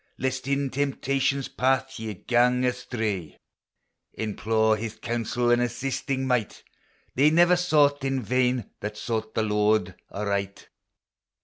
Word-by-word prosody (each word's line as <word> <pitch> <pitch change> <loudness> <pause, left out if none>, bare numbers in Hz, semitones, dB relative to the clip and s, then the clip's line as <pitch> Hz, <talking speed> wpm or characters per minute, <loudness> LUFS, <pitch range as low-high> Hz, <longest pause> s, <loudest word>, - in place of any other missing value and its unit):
Lest 130 0 -2
in 140 -1 0
temptation's 135 0 0
path 130 0 0
ye 110 -2 -5
gang 125 +5 +2
astray, 110 - -3 0.8
Implore 110 0 +1
his 110 0 -5
counsel 120 +2 -1
and 120 0 +4
assisting 130 +2 -2
might; 125 -4 -1 0.5
They 140 +4 +4
never 175 +3 +5
sought 150 -5 +3
in 135 -2 -1
vain 125 0 0
that 105 +1 -5
sought 110 -1 -3
the 110 - +1
Lord 105 -2 +1 0.2
aright 100 -1 -3
120 Hz, 120 wpm, -26 LUFS, 110-135 Hz, 0.8 s, never